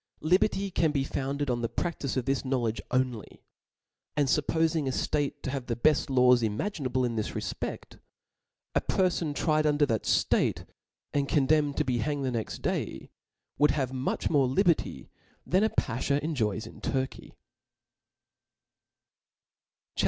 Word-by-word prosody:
Liber^ 190 +3 +2
can 160 - +3
be 140 -2 0
founded 140 0 -2
on 120 -1 -1
the 115 - -1
practice 150 -6 -2
of 125 - -1
this 135 0 0
knowledge 125 -4 -1
only; 125 -4 -2 0.7
and 145 -2 +3
fuppofing 160 +1 +1
a - - +1
ftate 145 +2 -1
to 130 - -2
have 135 -3 -4
the 120 - -1
beft 150 +4 +2
laws 125 -2 +5
imaginable 130 - -1
in 115 -2 -2
this 110 - -2
refpefl^ - - -5 0.7
a - - +2
perfon 175 -5 0
tried 155 -1 +2
under 145 0 +3
that 115 -6 -1
itate, - - +1 0.5
and 140 -1 0
condemned 145 0 +2
to 150 - +1
be 125 -2 0
hanged 140 +4 -1
the 130 - 0
next 115 -3 -4
day, - - -3 0.5
would 150 0 +5
have 130 -2 -1
much 130 0 -1
more 140 -4 +3
liberty, 140 - +1 0.3
than 190 +4 +2
a 220 - +3
baihaw 135 - 0
enjoys 110 -9 -1
in 115 - -12
Turkey* 130 -1 -3 2.6
CHAP. - - -8
135 Hz, 150 wpm, -28 LUFS, 125-150 Hz, 2.6 s, laws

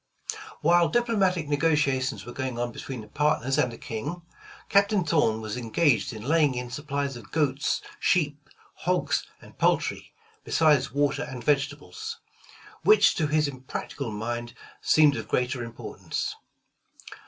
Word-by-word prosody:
While 170 +2 +4
diplomatic 195 -9 +1
negotations 145 -3 +1
were 120 - -8
going 130 -3 -3
on 120 0 -1
between 125 +1 -6
the 105 - -12
partners 150 -2 +1
and 125 -4 +2
the 115 - -9
King, 145 +10 -5 0.4
Captain 200 -1 +3
Thorn 115 -10 +2
was 110 0 -4
engaged 125 +4 +2
in 110 -2 -8
laying 150 -1 +3
in 125 0 -4
supplies 140 0 -3
of 110 -4 -11
goats, 145 -3 0 0.2
sheep, 145 -4 +1 0.3
hogs - - 0
and - - -16
poultry, - - +1 0.3
besides 150 -4 +3
water 145 0 +1
and 125 -2 -6
vegetables; 145 - -1 0.6
which 430 - +6
to 155 - 0
his 150 0 +2 0.2
practical 140 -4 -4
mind 120 +3 -4 0.3
seemed 150 -2 +5
of - - -5
greater 125 0 0
importance. 115 0 -5
145 Hz, 135 wpm, -27 LUFS, 125-160 Hz, 0.6 s, which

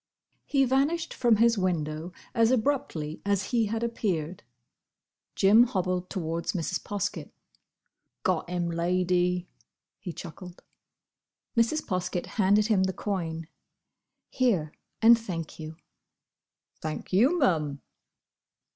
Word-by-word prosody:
He 275 -2 +3
vanished 285 +6 +1
from 240 -3 +3
his 230 0 +3
window 165 -2 -2 0.2
as 230 -2 +4
abruptly 220 - -1
as 200 -2 0
he 230 -3 +2
had 225 +2 -2
appeared. 185 -8 -2 0.9
Jim 215 +5 +6
hobbled 185 -5 -2
towards 170 0 -2
Mrs. 180 0 -2
Poskett. 205 -3 -3 0.9
"Got 180 -2 0
him, 175 -1 -1
Lady!" 180 +1 +1 0.5
he 180 - -6
chuckled. 175 +2 -10 0.9
Mrs. 235 +7 +2
Poskett 180 -1 -2 0.2
handed 205 +2 +4
him 205 -4 +3
the 190 - -1
coin. 165 -6 -3 0.8
"Here, 195 - +1 0.3
and 230 +1 +8
thank 170 -9 -6
you." 155 0 -7 1.1
"Thank 155 +3 -5
you, 255 - +4
mum." 155 - +1
185 Hz, 110 wpm, -28 LUFS, 170-230 Hz, 1.1 s, and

